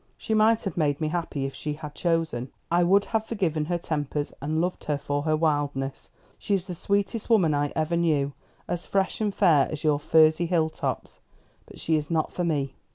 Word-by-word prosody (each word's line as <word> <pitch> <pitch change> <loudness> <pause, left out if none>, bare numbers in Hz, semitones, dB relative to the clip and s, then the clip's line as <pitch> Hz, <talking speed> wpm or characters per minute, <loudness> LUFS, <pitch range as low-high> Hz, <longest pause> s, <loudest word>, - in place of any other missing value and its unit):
"She 220 - -3
might 220 +1 +4
have 195 -5 -4
made 145 -3 +1
me 155 -1 -1
happy 160 -4 -2
if 135 - -4
she 150 - -4
had 150 0 -8
chosen. 165 -8 -1 0.2
I 175 +1 +4
would 195 +3 +4
have 220 0 +1
forgiven 165 -9 -1
her 175 +2 -1
tempers, 150 -3 -3
and 155 +3 -1
loved 180 +2 -2
her 150 -1 0
for 145 0 -2
her 155 +1 +1
wildness. 145 -4 -1 0.3
She 200 - 0
is 185 -2 -2
the 180 - -5
sweetest 200 +5 -1
woman 185 -9 +4
I 145 0 0
ever 160 +2 0
knew; 150 -5 +1 0.3
as 175 -1 -3
fresh 195 +2 0
and 210 -1 +1
fair 155 -7 +4
as 155 -1 -5
your 150 -2 +2
furzy 160 +2 +4
hill 165 -2 +1
tops. - - -4 0.5
But - - -13
she 160 -1 +1
is 150 -1 -4
not 160 -2 0
for 180 - -2
me. 145 -5 -1
160 Hz, 210 wpm, -26 LUFS, 145-175 Hz, 0.5 s, might